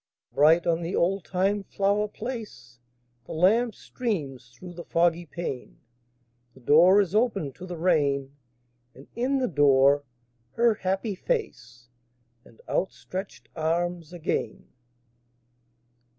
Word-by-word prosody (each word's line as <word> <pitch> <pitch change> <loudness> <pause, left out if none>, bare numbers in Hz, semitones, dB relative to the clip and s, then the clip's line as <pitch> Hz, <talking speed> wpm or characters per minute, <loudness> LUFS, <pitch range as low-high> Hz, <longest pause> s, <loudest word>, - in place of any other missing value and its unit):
Bright 155 +6 +4
on 170 0 +1
the 170 +3 -3
oldtime 195 +2 0
flower 200 +2 0
place 210 - -8 0.5
The - - -8
lamp 215 +8 +2
streams 145 - -4
through 175 +9 -12
the 170 0 -8
foggy 170 0 +1
pane; 135 - -6 0.8
The - - -16
door 165 +10 +6
is 190 -2 -3
opened 210 - 0
to 185 - -9
the 175 -1 -6
rain: 145 -5 +1 0.6
And 135 - -14
in 255 +4 0
the 260 -1 0
door 140 -2 +4 0.5
her 235 -1 +3
happy 195 +2 -2
face 125 - -4 0.6
And 115 - -20
outstretched 190 +1 -4
arms 170 0 -2
again. 175 -3 -4
175 Hz, 115 wpm, -26 LUFS, 145-200 Hz, 0.8 s, door